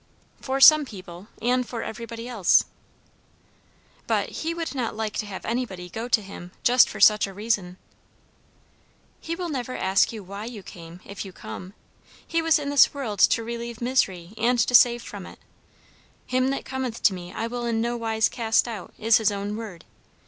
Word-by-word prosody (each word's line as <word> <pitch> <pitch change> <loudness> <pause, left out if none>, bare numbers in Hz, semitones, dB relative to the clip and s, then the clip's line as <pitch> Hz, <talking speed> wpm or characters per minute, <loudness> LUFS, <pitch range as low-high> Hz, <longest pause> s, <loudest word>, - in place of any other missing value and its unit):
"For 270 0 -2
some 305 +2 +9
people 185 -6 -10 0.2
and 250 +1 +2
for 235 -1 -6
everybody 230 +1 -7
else." 220 -8 +3 1.4
"But - - 0
he 325 - -3
would 335 -2 -4
not 250 -6 -3
like 220 -1 -3
to 215 - -3
have 195 -2 -7
anybody 195 -7 -3
go 225 +5 -4
to 225 -3 +2
him 180 -2 -10
just 250 +1 +5
for 215 - -8
such 210 0 +6
a 195 - -9
reason." 205 -4 -2 1.4
"He 330 - -4
will 355 0 -4
never 255 -4 -4
ask 190 +1 +2
why 200 -1 -7
you 225 -4 -8
came, 170 0 -11
if 200 - -7
you 195 - -9
come. 185 +2 -9 0.5
He 330 0 0
was 325 0 +4
in 285 -1 -3
this 285 0 +5
world 225 -8 -4
to 230 - +4
relieve 235 0 -6
misery, 195 -8 0
and 245 +2 +2
to 235 +1 +1
save 240 -1 +6
from - - -8
it. - - -13 0.9
'Him 255 0 +1
that 275 +1 -2
cometh 260 -3 -4
to 195 - +5
me 180 -1 -8
I 225 - -3
will 240 +1 -4
in 230 -1 0
no 235 +1 -1
wise 225 -1 +1
cast 225 -1 +1
out,' 220 -6 -7
is 225 +1 +4
his 220 -2 +2
own 205 +1 -4
word. 210 -7 -8
230 Hz, 185 wpm, -25 LUFS, 200-250 Hz, 1.4 s, some